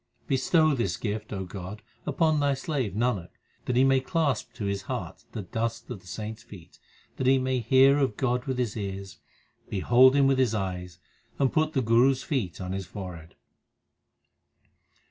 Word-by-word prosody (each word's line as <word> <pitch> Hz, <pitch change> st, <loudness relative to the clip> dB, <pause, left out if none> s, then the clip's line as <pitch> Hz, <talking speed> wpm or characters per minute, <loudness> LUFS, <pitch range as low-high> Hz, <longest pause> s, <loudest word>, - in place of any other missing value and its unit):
Bestow 155 Hz, +4 st, +3 dB
this 100 Hz, -9 st, -1 dB
gift, 110 Hz, 0 st, -4 dB
O 95 Hz, -2 st, -3 dB
God, 95 Hz, +3 st, -8 dB, 0.2 s
upon 155 Hz, -2 st, +2 dB
Thy 140 Hz, -1 st, +2 dB
slave 135 Hz, -, -2 dB
Nanak, 110 Hz, -6 st, 0 dB, 0.4 s
that 125 Hz, -, -1 dB
he 130 Hz, -, +5 dB
may 135 Hz, 0 st, +4 dB
clasp 145 Hz, -, -1 dB
to 110 Hz, -3 st, -5 dB
his 100 Hz, 0 st, -1 dB
heart -, -, -5 dB
the 105 Hz, -, -4 dB
dust 115 Hz, +4 st, -3 dB
of 115 Hz, -, -5 dB
the 90 Hz, -, -19 dB
saints 110 Hz, +3 st, -6 dB
feet, 90 Hz, -5 st, -14 dB, 0.4 s
That 130 Hz, -, -1 dB
he 135 Hz, +1 st, +6 dB
may 130 Hz, 0 st, 0 dB
hear 130 Hz, +4 st, +5 dB
of 130 Hz, -7 st, 0 dB
God 125 Hz, -1 st, 0 dB
with 130 Hz, -2 st, -2 dB
his 120 Hz, -4 st, -1 dB
ears, 100 Hz, -2 st, -6 dB, 0.5 s
behold 125 Hz, +7 st, +5 dB
Him 140 Hz, -1 st, +5 dB
with 135 Hz, -1 st, +3 dB
his 120 Hz, -4 st, +2 dB
eyes, 90 Hz, -3 st, -4 dB, 0.4 s
and 135 Hz, -2 st, +1 dB
put 155 Hz, 0 st, +1 dB
the 135 Hz, -4 st, +1 dB
Guru 120 Hz, +4 st, +5 dB
s 130 Hz, -, -7 dB
feet 120 Hz, -, -2 dB
on 90 Hz, -1 st, -4 dB
his 95 Hz, -1 st, -4 dB
forehead. 90 Hz, -4 st, -8 dB
120 Hz, 180 wpm, -27 LUFS, 100-135 Hz, 0.5 s, he